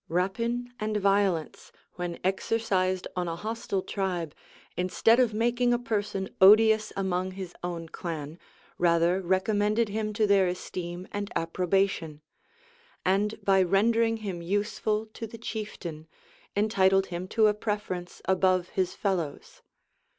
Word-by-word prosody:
Rapine 230 +8 -1
and 215 0 -1
violence, 195 -5 0 0.2
when 175 -1 -4
exercised 190 -2 0
on 180 -1 -1
a 165 - -2
hostile 215 -1 -3
tribe, 180 -6 -2 0.4
instead 205 +6 +3
of 245 -3 +4
making 240 +3 +1
a - - +1
person 205 -5 -2
odious 215 +2 +6
among 185 -1 -1
his 185 -2 -7
own 170 -2 -4
clan, 160 -1 -6 0.4
rather 170 +2 +3
recommended 205 +4 +1
him 215 +1 -2
to 215 0 +2
their 200 -2 +4
esteem 180 0 -5
and 205 0 -4
approbation; 170 -2 0 0.8
and 200 +3 +1
by 195 -1 +5
rendering 225 +5 +3
him 180 -4 -4
useful 210 +3 -1
to 225 - -6
the 230 - -10
chieftain, 185 -8 -6 0.5
entitled 195 -2 +3
him 175 +2 -4
to 220 +3 +3
a 210 - +5
preference 205 -4 -4
above 185 -1 +2
his 185 -2 -1
fellows. 175 -8 -3
195 Hz, 130 wpm, -28 LUFS, 180-215 Hz, 0.8 s, odious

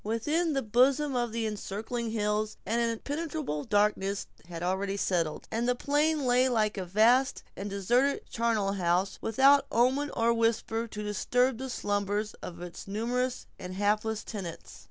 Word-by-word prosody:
Within 295 +10 0
the 270 - 0
bosom 260 +5 +3
of 240 -2 0
the 230 0 -2
encircling 220 +3 -4
hills, 215 0 -1
an 230 +4 0
impenetrable 275 - -2
darkness 205 -1 +1 0.2
had 170 -1 -6
already 195 +2 -1
settled; 170 -6 -1
and 235 +2 0
the 250 - +2
plain 295 +2 +1
lay 250 +1 +4
like 215 -3 +1
a 190 -2 -4
vast 235 +8 +3
and 200 +1 -5
deserted 240 +8 +1
charnel 225 -4 0
house, 185 0 0
without 270 +5 +4
omen 260 +5 +2
or 230 0 +3
whisper 230 0 0
to 210 -1 -6
disturb 245 +4 +1
the 265 0 -4
slumbers 205 -1 -1
of 175 0 -7
its 175 +2 -9
numerous 245 +5 -1
and 185 0 -7
hapless 210 +2 0
tenants. 190 -7 -7
225 Hz, 155 wpm, -29 LUFS, 200-250 Hz, 0.2 s, lay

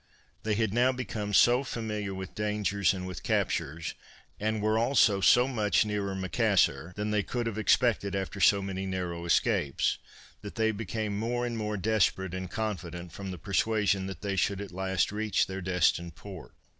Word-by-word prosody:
They 110 -1 0
had 110 -2 0
now 125 +2 +4
become 105 -4 -4
so 120 +6 +5
familiar 105 -5 -4
with 95 -1 -7
dangers 105 -2 +1
and 95 -2 -4
with 90 -3 -6
captures, 80 +3 -1 0.5
and 110 +1 -1
were 110 +1 +1
also 115 -5 +3
so 125 +6 +5
much 110 -6 +2
nearer 100 -2 -2
Macassar, 90 -4 +1
than 105 +1 -2
they 105 -1 +2
could 120 +4 -3
have 110 -2 -3
expected 110 -2 +2
after 95 +1 -3
so 100 0 +5
many 95 0 -4
narrow 90 -2 -3
escapes, 75 -4 +1 0.4
that 105 - -8
they 110 -1 +2
became 110 0 -3
more 120 +2 -1
and 120 -1 -3
more 105 -1 -2
desperate 95 -2 +1
and 95 -1 -4
confident, 90 -6 -4
from 95 +2 -7
the 90 - -5
persuasion 100 +1 +1
that 95 - -7
they 100 -1 -2
should 100 +1 0
at 100 -2 -6
last 95 0 0
reach 105 -2 +1
their 95 0 -6
destined 85 -2 +1
port. 95 -4 -11
100 Hz, 175 wpm, -29 LUFS, 95-110 Hz, 0.5 s, so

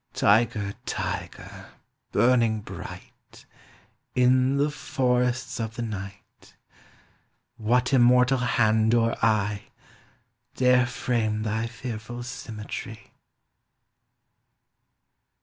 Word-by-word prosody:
Tiger! 105 -1 +2
Tiger! - - -5 0.4
burning 115 -1 +3
bright, - - -11 0.7
In 130 +2 +3
the 145 +1 +1
forests 125 -2 -1
of 110 0 -4
the 120 - -4
night, 100 -3 -9 1.0
What 125 +4 +1
immortal 125 +1 +5
hand 110 -2 +2
or 115 -1 +2
eye 105 -2 +1 0.9
Dare 125 -1 +4
frame 110 -3 -1
thy 110 +1 -1
fearful 120 0 -7
symmetry? 110 -4 -8
120 Hz, 80 wpm, -25 LUFS, 110-125 Hz, 1.0 s, immortal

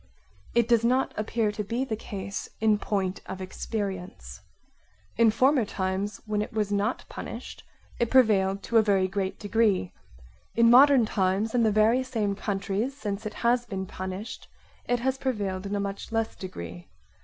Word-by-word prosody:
It 235 -1 +4
does 235 -2 +4
not 255 +3 +2
appear 215 0 0
to 210 0 -4
be 235 +6 -2
the 225 - -2
case 200 -1 -6
in 215 -2 +3
point 195 -3 -2
of 190 0 -6
experience. 185 - -5 0.7
In 230 0 +5
former 255 +4 +3
times, 195 +1 -3
when 210 -1 -1
it 210 - -4
was 210 -2 -1
not 205 +4 0
punished, - - -8 0.4
it 235 - +1
prevailed 200 -6 +3
to 235 - +1
a - - +8
very 195 -3 +2
great 190 0 -2
degree; 210 - +1 0.6
in 230 0 +5
modern 265 -1 +7
times 200 +1 0
in 245 - +3
the 220 -2 +3
very 215 +4 +4
same 225 -6 -1
countries 205 +6 -2
since 210 -3 -4
it 215 - -8
has 240 +1 +4
been 190 -3 -4
punished 190 +4 -6 0.4
it 245 -1 +1
has 265 +1 0
prevailed 200 -7 -2
in 200 - -2
a - - 0
much 200 +2 -4
less 225 0 -1
degree. 85 - -8
210 Hz, 165 wpm, -27 LUFS, 195-230 Hz, 0.7 s, a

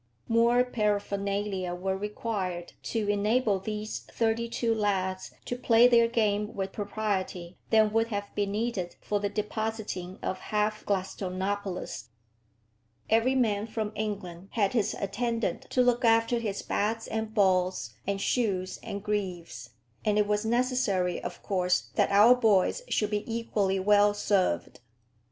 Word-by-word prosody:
More 235 +2 +4
paraphernalia 200 -4 -1
were 190 +2 -2
required 195 -3 -4 0.2
to 220 -3 -1
enable 205 +1 +2
these 215 +2 -4
thirty 230 0 -1
two 230 -1 0
lads 190 -3 -1
to 245 - -3
play 240 -1 +5
their 235 -1 +5
game 210 -2 0
with 195 -1 -3
propriety 195 -4 -3
than 215 -1 +4
would 225 0 +2
have 205 -2 -4
been 200 -1 -1
needed 210 -5 -2
for 205 - -1
the 205 0 -1
depositing 210 -3 -3
of 185 - -2
half 215 +1 -1
Gladstonopolis. 190 - -3 1.0
Every 230 +4 +3
man 220 -4 +1
from 215 -1 -3
England 195 -4 -5
had 205 -2 +1
his 220 -5 +1
attendant 230 +3 -2
to 250 - +3
look 245 0 +2
after 230 +1 +3
his 205 -4 -3
bats 225 +2 -1
and 220 0 -3
balls, 185 -3 +1
and 200 0 -1
shoes 195 -5 0
and 200 0 -6
greaves; 180 - -3 0.3
and 210 -1 +2
it 210 - +4
was 210 +1 0
necessary, 230 -6 +1
of - - -7
course, 180 -2 0
that - - +2
our 210 +5 +7
boys 220 - +3
should 210 -1 0
be 210 0 0
equally 205 -4 0
well 205 +1 +4
served. 185 - 0
210 Hz, 140 wpm, -28 LUFS, 195-225 Hz, 1.0 s, our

